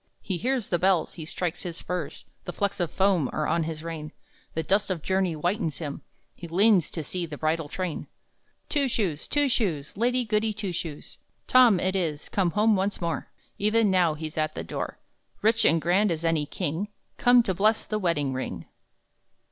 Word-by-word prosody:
He 185 - -2
hears 250 +2 -1
the 175 - +1
bells, 185 -2 +2
he 160 - -7
strikes 175 +1 -3
his 170 -2 -5
spurs, 180 0 -4 0.2
The - - -3
flecks 200 +1 -2
of 175 -3 0
foam 190 -8 +2
are 155 - -1
on 170 - +1
his 160 -1 -5
rein, 160 -2 -5 0.4
The 160 - 0
dust 200 +5 +1
of 180 -5 -2
journey 190 -2 +1
whitens 170 +1 -1
him, 145 -4 -5 0.3
He 170 - -9
leans 190 0 +4
to 160 - -4
see 175 +3 -3
the 150 -2 -7
bridal 155 0 -1
train! 180 -2 -4 0.6
Two 285 -3 +1
Shoes, 185 - -1
Two 290 -1 +2
Shoes, 175 - -1
Lady 245 +3 +1
Goody 215 0 +1
Two 205 -3 -4
Shoes! 160 -3 -6 0.3
Tom 245 -7 +6
it 185 +2 0
is, 160 -6 -2
come 190 -3 +1
home 215 +1 +5
once 195 +1 -1
more! 170 -2 -2 0.3
Even 215 0 +3
now 175 -4 +3
he's 155 0 -5
at 155 0 -1
the - - -4
door, - - -4 0.5
Rich 225 +1 +4
and 165 +2 +5
grand 180 +6 +3
as 165 0 -2
any 160 -3 +1
king 175 +4 -2 0.3
Come 245 -2 +6
to 190 - 0
bless 210 +4 +2
the 215 - -2
wedding 150 -8 0
ring! 130 - -4
180 Hz, 190 wpm, -27 LUFS, 160-210 Hz, 0.6 s, Tom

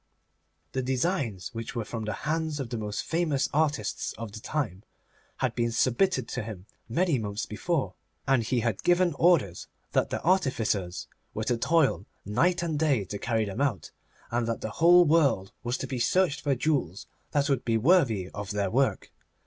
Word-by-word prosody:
The 130 - -1
designs, 130 - -1
which 115 +1 -6
were 115 -2 -2
from 115 -1 -5
the 105 - -2
hands 160 -1 -1
of 130 -4 -4
the 120 - -2
most 105 -1 -3
famous 155 -5 0
artists 150 -1 0
of 115 -2 -7
the 110 - -8
time, 110 - -3 0.6
had - - 0
been 120 -1 0
submitted 130 - +1
to 125 - -3
him 105 -4 -8 0.2
many 160 +2 +1
months 105 0 -3
before, 145 +8 -2 0.3
and 135 -3 +4
he 120 +2 0
had 110 -4 -1
given 175 -1 +3
orders 150 - +3 0.2
that - - +1
the - - -2
artificers 115 - 0 0.3
were 110 - -2
to 120 +2 0
toil 150 -5 +2 0.2
night 170 - +1
and 160 -3 -1
day 140 -10 +2
to 100 - -6
carry 110 -1 0
them 100 +6 -4
out, 135 -9 -1 0.4
and 120 0 0
that 115 - -2
the 110 - -4
whole 175 +7 +6
world 145 - +3
was 120 +1 -1
to - - -4
be 130 -1 -4
searched 170 +4 +2
for 140 -2 +1
jewels 125 - -1 0.2
that 145 -1 +1
would 135 -4 +1
be 115 -1 +1
worthy 120 - +3
of 100 -1 -6
their 100 -2 -1
work. 135 +3 0
125 Hz, 180 wpm, -28 LUFS, 110-155 Hz, 0.6 s, whole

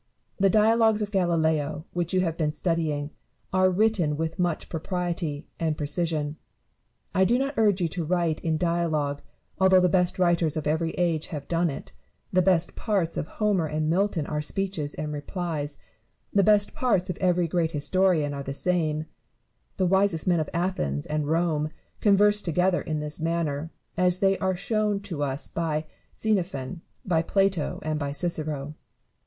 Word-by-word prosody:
The 195 0 +4
dialogues 220 +1 +4
of 205 - -5
Galileo, 160 -5 +1
which 175 -1 -1
you 185 -1 +2
have 165 -3 -1
been 150 -2 -1
studying, 155 -4 -1 0.4
are 185 0 +4
written 185 -6 +2
with 160 +3 -3
much 175 -3 0
propriety 170 -3 -3
and 160 -2 0
precision. 150 0 -2 0.8
I 190 - +4
do 235 +6 +3
not 275 +2 -1
urge 205 -4 +3
you 170 - +2
to 170 +1 -3
write 170 -1 0
in 160 -1 0
dialogue, 155 -4 0 0.4
although 190 0 +6
the 180 - +3
best 180 +1 +2
writers 175 -3 +2
of 155 - -3
every 160 +2 +1
age 170 -3 0
have 150 -4 -6
done 170 0 +1
it; 135 - -7 0.4
the 185 - +5
best 180 -2 +2
parts 195 -7 -1
of - - -3
Homer 205 -6 0
and 155 +1 -1
Milton 185 -3 +1
are 150 0 -2
speeches 160 -2 -2
and 150 0 -4
replies; 150 -1 -3 0.6
the 200 - +5
best 205 +1 +4
parts 195 -7 +1
of 175 - -7
every 180 -2 +2
great 165 -1 +1
historian 160 -1 +1
are 140 - -4
the 135 0 -5
same: 155 -1 0 0.7
the 185 - +2
wisest 190 -2 +2
men 175 -2 +3
of 155 - -2
Athens 170 - -1
and 150 -1 -1
of - - -4
Rome 160 -2 +1 0.3
converse 205 0 +5
together 180 +1 +1
in 155 -2 -3
this 150 0 -3
manner, 165 -2 -1 0.3
as 180 -1 +3
they 195 0 +3
are 190 -1 0
shown 210 +2 0
to 180 -7 -5
us 140 -1 -1
by 155 -2 -2 0.3
Xenophon, 175 -7 -1 0.2
by 165 -4 +2
Plato, 195 -2 +1
and 155 -1 -1
by 140 -1 -2
Cicero. 150 -3 -2
170 Hz, 170 wpm, -26 LUFS, 155-185 Hz, 0.8 s, although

